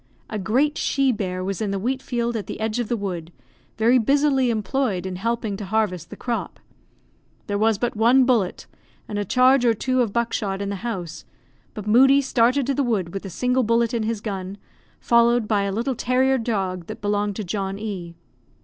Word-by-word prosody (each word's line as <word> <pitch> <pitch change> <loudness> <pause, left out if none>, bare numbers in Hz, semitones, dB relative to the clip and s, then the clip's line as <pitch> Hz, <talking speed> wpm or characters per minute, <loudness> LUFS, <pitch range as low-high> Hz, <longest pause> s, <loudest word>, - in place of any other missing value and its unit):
A 215 - -2
great 260 +10 +1
she 275 -1 +2
bear 185 -5 -3
was 195 +2 -3
in 215 - -1
the 195 - -1
wheat 255 +7 -2
field 240 -2 -2
at 215 - -4
the - - -6
edge 220 +2 -1
of 240 - -1
the 240 - -1
wood, 180 -5 -5 0.5
very 235 +3 +4
busily 275 +1 +2
employed 220 -3 -1
in 185 -1 -4
helping 225 +1 -2
to 205 - -6
harvest 190 -4 -1
the - - -8
crop. 240 -2 -4 0.9
There 205 0 -2
was 220 -1 +3
but 240 +2 -2
one 240 +4 +5
bullet, 230 -8 0 0.4
and 205 - -3
a 205 - -2
charge 255 +5 +4
or 230 -2 +3
two 255 +3 0
of 230 -4 0
buckshot, 215 -4 -1
in 200 0 -3
the 200 - -3
house; 180 -7 -5 0.5
but 210 -2 -6
Moodie 270 +6 +6
started 255 +1 +2
to 275 - 0
the 280 - 0
wood 210 -10 -1
with 195 - -4
the 195 - -7
single 250 +7 +1
bullet 230 0 +1
in 235 - 0
his 220 -1 -2
gun, 195 -2 -5 0.4
followed 235 -1 +3
by 205 -2 +1
a 200 - -1
little 235 +7 -1
terrier 260 +2 +1
dog 190 -6 -2
that - - -7
belonged 205 0 -1
to 215 - -4
John 195 +1 -3
E 190 -5 -6
220 Hz, 205 wpm, -23 LUFS, 195-245 Hz, 0.9 s, Moodie